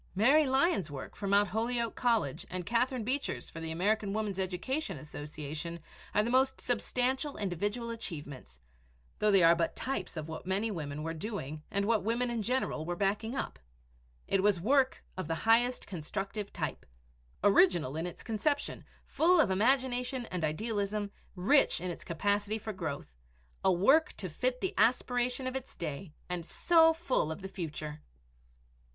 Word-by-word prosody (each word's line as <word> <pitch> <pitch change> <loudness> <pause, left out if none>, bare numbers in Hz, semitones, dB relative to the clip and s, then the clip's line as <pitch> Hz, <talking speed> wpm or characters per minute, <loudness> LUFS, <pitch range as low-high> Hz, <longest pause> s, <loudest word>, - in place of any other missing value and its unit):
Mary 275 +9 +5
Lyon's 265 - +2
work 140 -2 -7
for 200 - -4
Mt. 200 0 +4
Holyoke 230 +3 0
College 225 - 0
and 180 -1 -4
Catherine 245 +2 +1
Beecher's 265 +5 -2
for 165 - -7
the 165 0 -4
American 200 +5 0
Woman's 210 -3 -2
Education 190 - -2
Association 150 +3 -6 0.4
are 210 - +4
the 235 - -1
most 265 +1 +3
substantial 255 +4 -1
individual 205 +5 -2
achievements, 145 - -7 0.6
though 210 - +3
they 195 -3 +6
are 165 +1 +7
but 170 0 0
types 230 -10 -3
of 155 0 -4
what 160 +2 -7
many 200 +4 0
women 150 -5 -4
were 165 0 -2
doing 160 -5 -5
and 200 0 0
what 220 -2 +2
women 240 +3 0
in 235 -2 -1
general 245 -8 -1
were 175 +2 -3
backing 205 +6 0
up. - - -4 0.7
It 195 - +2
was 200 -2 +3
work 260 +7 +2
of 185 - -4
the 165 - 0
highest 240 +2 +4
constructive 195 +4 -4
type - - -4 0.6
original 180 -8 +4
in 165 +2 -2
its 175 - -9
conception, 285 +6 -1 0.2
full 345 +2 +4
of 255 -11 +4
imagination 250 +3 +1
and 180 -3 -2
idealism, 205 +4 -1 0.2
rich 210 +9 +4
in 180 +1 -3
its - - -8
capacity 205 +5 0
for 220 0 -5
growth 155 - -5 0.5
a 190 - +5
work 265 - +4
to 185 - -6
fit 250 +10 -1
the 380 - -1
aspiration 245 +3 +2
of 255 0 -3
its 265 -1 -6
day 155 +1 -5
and 180 -1 -3
so 325 - +5
full 320 - 0
of 160 - -6
the - - -3
future! 155 -5 -6
205 Hz, 165 wpm, -31 LUFS, 170-245 Hz, 0.7 s, are